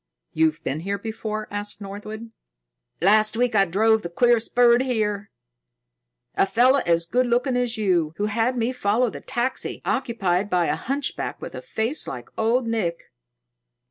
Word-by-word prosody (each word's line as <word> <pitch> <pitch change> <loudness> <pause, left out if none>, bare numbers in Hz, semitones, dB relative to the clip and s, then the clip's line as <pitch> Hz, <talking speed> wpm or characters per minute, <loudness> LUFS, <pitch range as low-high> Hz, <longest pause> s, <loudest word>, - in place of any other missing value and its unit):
"You've 160 0 +1
been 145 - -2
here 200 +4 -3
before?" 215 0 -5
asked 205 0 -4
Northwood. 215 +3 -8 0.7
"Last 215 +4 +4
week 245 0 +1
I 200 -2 +4
drove 220 +5 +2
the 170 - -5
queerest 235 +5 +2
bird 240 0 +5
here 210 -5 -1 1.0
a - - +2
fellow 255 +6 +4
as 170 0 +3
good 250 +8 +1
looking 245 +2 +1
as 245 -2 0
you, 175 -7 +1
who 205 - 0
had 225 +4 0
me 235 +1 0
follow 240 0 +1
the - - -9
taxi 245 +2 -3
occupied 205 -7 0
by 180 -2 +2
a - - 0
hunchback 275 +3 -3
with - - -8
a - - -7
face 275 - -2
like 125 -2 -7
Old 235 +3 +1
Nick." 215 -7 -2
220 Hz, 160 wpm, -23 LUFS, 195-240 Hz, 1.0 s, bird